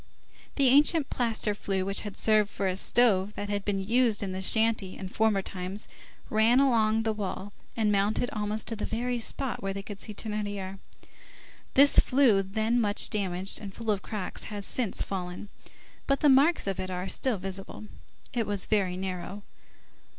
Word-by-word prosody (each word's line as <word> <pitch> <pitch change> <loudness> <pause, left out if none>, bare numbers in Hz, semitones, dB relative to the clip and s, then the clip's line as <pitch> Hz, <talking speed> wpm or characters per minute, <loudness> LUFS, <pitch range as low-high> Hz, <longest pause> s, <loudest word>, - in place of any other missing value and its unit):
An 280 - +2
ancient 285 +3 +4
plaster 225 -4 -1
flue, 195 -2 -3
which 195 0 0
had 205 -2 -7
served 215 -2 +3
for 200 - -4
a 185 - -1
stove 205 -1 +2
that 205 - -5
had 205 -1 -2
been 200 -1 -1
used 230 -3 +2
in 195 - -4
the 185 0 -4
shanty 220 -1 +2
in 190 - -6
former 215 -1 +1
times, 190 +3 -4 0.4
ran 225 +3 +4
along 225 -5 +2
the 220 -1 0
wall 205 -1 -5 0.2
and 215 -2 +2
mounted 205 +4 +1
almost 210 0 -3
to 225 - -3
the 210 - -6
very 240 +2 -2
spot 255 +2 -2
where 195 0 -3
they 200 - -5
could 200 -1 -9
see - - -5
Thénardier. 205 -2 -4 1.0
This 280 +1 +7
flue, 255 -7 +3
then 220 +5 0
much 205 -2 +1
damaged 190 -2 -1
and 200 -2 -8
full 225 -2 -2
of 200 -2 -1
cracks, 205 -4 -5
has 205 -2 -5
since 240 -6 0
fallen, 180 +1 -6 0.6
but 275 0 +1
the 300 - +5
marks 280 +6 +4
of 195 -2 -3
it 185 0 -4
are 180 0 -4
still 250 0 -1
visible. 195 +3 -7 0.5
It 235 -3 -1
was 205 -2 +6
very 190 -4 0
narrow. 190 +2 -5
210 Hz, 180 wpm, -28 LUFS, 195-230 Hz, 1.0 s, This